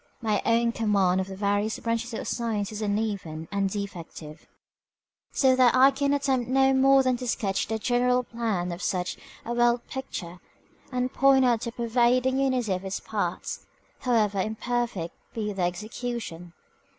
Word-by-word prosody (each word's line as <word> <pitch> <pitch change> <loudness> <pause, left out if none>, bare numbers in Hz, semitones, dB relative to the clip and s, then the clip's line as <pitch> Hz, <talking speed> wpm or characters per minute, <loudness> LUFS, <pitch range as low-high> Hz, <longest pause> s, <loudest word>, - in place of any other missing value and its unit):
My 215 -4 0
own 235 0 +3
command 200 -5 +2
of 190 - -4
the 190 - -7
various 205 +2 0
branches 230 +1 -2
of - - -5
science 220 -4 -2
is 215 0 -6
uneven 205 -7 -2
and 200 -1 0
defective, 170 -6 -7 0.8
so 260 -2 +4
that 255 -2 +5
I 265 +2 +7
can 280 +1 0
attempt 270 -4 0
no 270 +1 +4
more 270 0 +5
than 255 -1 +1
to 250 0 -6
sketch 195 -4 -1
the 220 - -1
general 250 +2 +2
plan 220 -7 -2
of 170 +2 -6
such 180 -1 -1 0.3
a 235 - -2
world 240 0 +2
picture, 180 -10 -6 0.5
and 250 0 -1
point 270 -1 +5
out 235 -3 +2
the 235 - -3
pervading 245 +3 +2
unity 255 -6 +1
of 185 +1 -3
its 190 0 -3
parts, - - -4 0.3
however 215 -5 +1
imperfect 220 -4 -2 0.2
be 210 -2 -2
the 195 - -4
execution. 180 -1 -4
230 Hz, 160 wpm, -26 LUFS, 200-250 Hz, 0.8 s, I